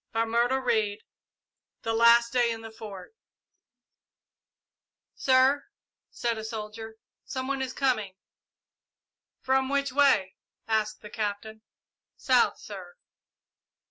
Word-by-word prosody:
CHAPTER 235 +3 +1
XXI 215 -4 +1 0.9
THE 225 - -1
LAST 235 +1 +5
DAY 240 -2 +3
IN 225 -1 -5
THE 225 0 -9
FORT 210 - -10 2.0
"Sir," 265 +2 +3 0.4
said 235 -2 -2
a - - -6
soldier; 220 0 -7 0.3
"some 260 -1 -5
one 275 -1 -2
is 260 -1 -2
coming!" 230 -9 -1 1.3
"From 265 0 +1
which 280 -1 0
way?" 255 -9 +3 0.3
asked 215 -1 0
the 210 - -9
Captain. 215 0 -4 0.6
"South, - - +3
sir." 470 - -10
230 Hz, 105 wpm, -27 LUFS, 220-260 Hz, 2.0 s, LAST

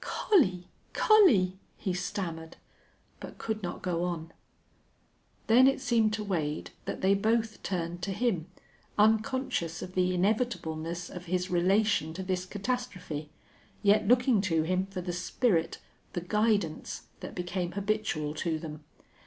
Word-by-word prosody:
"Collie 190 - +2 0.3
Collie 215 - +5
" - - -38
he 190 - +1
stammered, 175 -3 -4 0.6
but - - -9
could 220 -1 -3
not 175 -2 -5
go 175 -2 0
on. 165 -2 -3 1.1
Then 250 +4 +6
it 270 - +2
seemed 235 -4 +2
to 215 0 -2
Wade 160 -7 -2
that - - -4
they 190 +1 +4
both 220 +2 0
turned 175 -2 -3
to 195 - -2
him 190 -6 0 0.5
unconscious 220 -5 +1
of 185 - -8
the 185 0 +2
inevitableness 175 -5 -1
of 180 -1 -8
his 180 +1 -1
relation 180 -2 +2
to 190 - -4
this 185 -1 -2
catastrophe, 195 - -4 0.5
yet 205 +1 +4
looking 245 -3 +4
to 165 -5 +1
him 185 +3 0
for 195 -2 -5
the 175 0 -4
spirit, 180 -1 0 0.4
the 175 - -2
guidance 205 -3 0 0.2
that - - -8
became 175 0 -3
habitual 200 -7 -1
to 160 +1 -1
them. 155 -1 -8
185 Hz, 140 wpm, -29 LUFS, 175-215 Hz, 1.1 s, Then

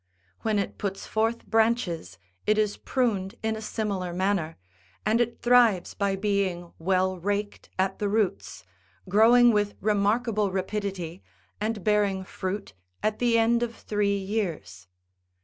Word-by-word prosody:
When 220 -2 0
it 200 - -3
puts 195 -1 -3
forth 225 +2 -1
branches 220 - 0 0.3
it 215 0 +4
is 210 -1 +1
pruned 210 -7 -1
in 220 0 0
a 220 - -6
similar 200 -5 -3
manner, 180 -3 0 0.5
and 225 +3 +3
it 240 0 -2
thrives 240 -6 +4
by 200 -1 0
being 190 -4 -1
well 185 +1 +1
raked 205 +3 -3
at 190 +1 0
the 205 - 0
roots, 195 - -1 0.4
growing 235 +5 +6
with 205 -1 0
remarkable 210 +1 +1
rapidity, 190 -2 -3 0.4
and 215 -2 -2
bearing 205 -3 +2
fruit 190 +2 -5 0.3
at 215 0 0
the 240 -2 +3
end 235 +1 +3
of 235 -1 -2
three 205 -1 0
years. 170 - -4
205 Hz, 135 wpm, -26 LUFS, 190-220 Hz, 0.5 s, growing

